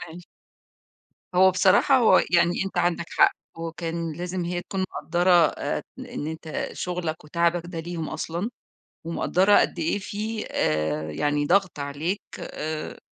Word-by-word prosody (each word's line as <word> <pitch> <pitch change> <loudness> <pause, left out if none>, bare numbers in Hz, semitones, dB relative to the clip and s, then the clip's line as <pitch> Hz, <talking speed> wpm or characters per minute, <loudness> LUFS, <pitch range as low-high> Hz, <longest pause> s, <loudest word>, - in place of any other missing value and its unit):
ماشي. 170 +2 -11 1.1
هو 190 +1 +6
بصراحة 190 +8 +4
هو 225 -7 +6
يعني 175 +2 +3
أنت 195 - -4
عندك 170 -1 +1
حق - - +5 0.2
وكان 165 0 -4
لازم 180 +2 -4
هي 175 +1 -2
تكون 195 - -4
مقدَّرة 175 +2 0 0.2
آآ - - -3 0.2
إن 145 - -6
أنت 160 0 -4
شُغلك 175 -4 -4
وتعبك 170 +2 +1
ده 170 -2 -5
ليهم 165 -1 -5
أصلًا، 175 +8 -3 0.6
ومقدَّرة 185 +4 +3
قد 175 - 0
إيه 165 +5 0
في 215 +2 -4
آآ 75 0 0
يعني 145 - 0
ضغط 185 -2 +2
عليك، 150 +8 -2 0.2
آآ 155 0 -5
170 Hz, 135 wpm, -25 LUFS, 160-185 Hz, 1.1 s, هو